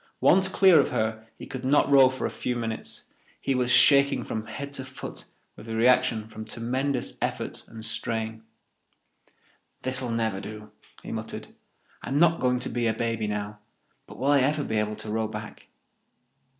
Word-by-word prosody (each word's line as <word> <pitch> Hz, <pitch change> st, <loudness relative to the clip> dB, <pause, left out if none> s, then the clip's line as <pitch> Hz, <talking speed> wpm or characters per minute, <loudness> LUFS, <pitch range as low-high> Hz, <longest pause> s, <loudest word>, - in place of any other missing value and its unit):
Once 190 Hz, 0 st, +5 dB
clear 190 Hz, -3 st, +6 dB
of 140 Hz, -, +2 dB
her 110 Hz, 0 st, -2 dB
he -, -, -9 dB
could 130 Hz, -1 st, -7 dB
not 140 Hz, +3 st, +3 dB
row 135 Hz, -2 st, +7 dB
for 130 Hz, 0 st, -4 dB
a -, -, 0 dB
few 125 Hz, -, -3 dB
minutes; 115 Hz, -2 st, -4 dB, 0.4 s
he 135 Hz, -, 0 dB
was 125 Hz, -1 st, 0 dB
shaking 140 Hz, +1 st, +6 dB
from 110 Hz, 0 st, -5 dB
head 140 Hz, +5 st, -6 dB
to 135 Hz, -, -5 dB
foot 130 Hz, -, -8 dB, 0.3 s
with 105 Hz, -, -12 dB
the 115 Hz, -, -4 dB
reaction 120 Hz, -1 st, +3 dB
from 110 Hz, 0 st, -8 dB
tremendous 125 Hz, +4 st, -2 dB
effort -, -, -3 dB
and 110 Hz, -1 st, -9 dB
strain. 110 Hz, -1 st, -3 dB, 1.4 s
"This'll 130 Hz, -1 st, 0 dB
never 110 Hz, -4 st, -1 dB
do," 105 Hz, 0 st, -9 dB, 0.3 s
he -, -, -7 dB
muttered. -, -, -6 dB, 0.5 s
"I'm 135 Hz, -, -2 dB
not 165 Hz, +1 st, +4 dB
going 125 Hz, -1 st, +2 dB
to -, -, -2 dB
be 120 Hz, 0 st, -1 dB
a 110 Hz, -, +1 dB
baby 115 Hz, -2 st, -1 dB
now. 105 Hz, 0 st, -4 dB, 0.5 s
But -, -, -12 dB
will 135 Hz, +4 st, +1 dB
I 145 Hz, -, +5 dB
ever 145 Hz, +3 st, +1 dB
be 110 Hz, -, -2 dB
able 105 Hz, 0 st, -1 dB
to 110 Hz, -, -7 dB
row 110 Hz, 0 st, 0 dB
back?" 110 Hz, -, -8 dB
120 Hz, 175 wpm, -26 LUFS, 110-135 Hz, 1.4 s, row